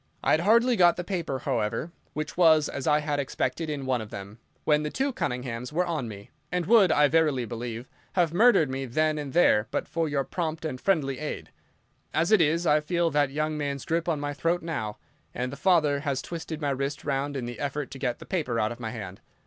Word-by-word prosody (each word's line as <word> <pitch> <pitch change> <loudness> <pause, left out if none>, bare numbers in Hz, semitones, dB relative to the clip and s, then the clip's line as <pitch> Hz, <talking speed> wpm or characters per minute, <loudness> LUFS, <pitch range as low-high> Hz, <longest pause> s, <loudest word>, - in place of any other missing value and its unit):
I - - +2
had 155 - +4
hardly 235 +7 +4
got 175 -4 +5
the 175 - -4
paper, 170 -7 -2
however—which 145 +7 -3
was, 160 -4 +5
as 135 - -5
I 150 0 +4
had 150 -1 -1
expected, 140 +3 -2
in 145 -3 -3
one 130 -2 0
of 110 - -8
them—when 110 +9 -3
the 150 - -2
two 270 - -1
Cunninghams 125 - -3
were 175 +4 +1
on 155 -8 -2
me, 100 -2 -10 0.2
and 180 -1 0
would, 210 -4 +6
I 150 -1 +5
verily 150 -5 +2
believe, 120 +1 -5 0.3
have 170 -3 +2
murdered 215 - +5
me 135 +1 -3
then 155 +5 +1
and 145 -2 -5
there 125 -10 +4
but - - -2
for 165 -2 -1
your 140 -1 0
prompt 160 +2 -3
and 130 -5 -4
friendly 145 -9 +1
aid. 150 - -5 0.6
As 165 +5 +2
it 215 -5 +6
is, 165 +3 +2
I 150 -1 +4
feel 170 +2 0
that 145 -1 +2
young 155 +2 -2
man's 140 -2 -3
grip 165 +1 0
on 155 -3 0
my 145 0 -3
throat 165 +4 0
now, 110 -11 -3 0.4
and 125 +1 -2
the - - -6
father 155 -5 +3
has 140 -2 -2
twisted 165 -2 -6
my 145 -3 -1
wrist 140 +2 -3
round 140 0 -1
in 125 - -3
the 120 0 -7
effort 145 0 -3
to 135 - -8
get 125 -3 -1
the - - -11
paper 150 -11 -1
out 110 0 +1
of 120 - -8
my 115 -2 -4
hand. 100 -5 -7
150 Hz, 220 wpm, -27 LUFS, 130-165 Hz, 0.6 s, would